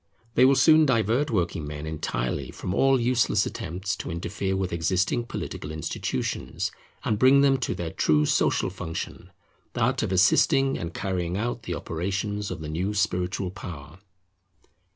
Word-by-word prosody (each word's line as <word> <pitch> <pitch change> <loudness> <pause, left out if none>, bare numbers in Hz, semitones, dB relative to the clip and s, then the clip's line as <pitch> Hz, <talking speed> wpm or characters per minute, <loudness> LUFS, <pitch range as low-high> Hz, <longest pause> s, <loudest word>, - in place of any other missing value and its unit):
They 125 - +5
will 135 +1 +6
soon 155 +1 +6
divert 120 +4 +2
working 85 -7 -1
men 75 +1 -6
entirely 65 -4 -3
from 90 - -5
all 135 +4 +4
useless 120 -4 +2
attempts 95 +4 -4
to - - -6
interfere 95 +3 -2
with 95 -2 -2
existing 95 +7 0
political 75 - -5
institutions, 75 -4 -3 0.3
and 105 -2 0
bring 135 +3 +6
them 135 -1 +4
to 125 - -2
their 85 -2 -4
true 75 0 +2
social - - +1
function, 80 0 -6 0.4
that - - +1
of - - -2
assisting 135 - +4
and 85 - -4
carrying 90 -2 -2
out 120 +2 -2
the 90 -5 -4
operations 100 +6 -3
of 90 -3 -5
the 75 - -5
new 90 +7 -2
spiritual 90 -2 -1
power. 80 -3 -9
95 Hz, 150 wpm, -26 LUFS, 85-115 Hz, 0.4 s, will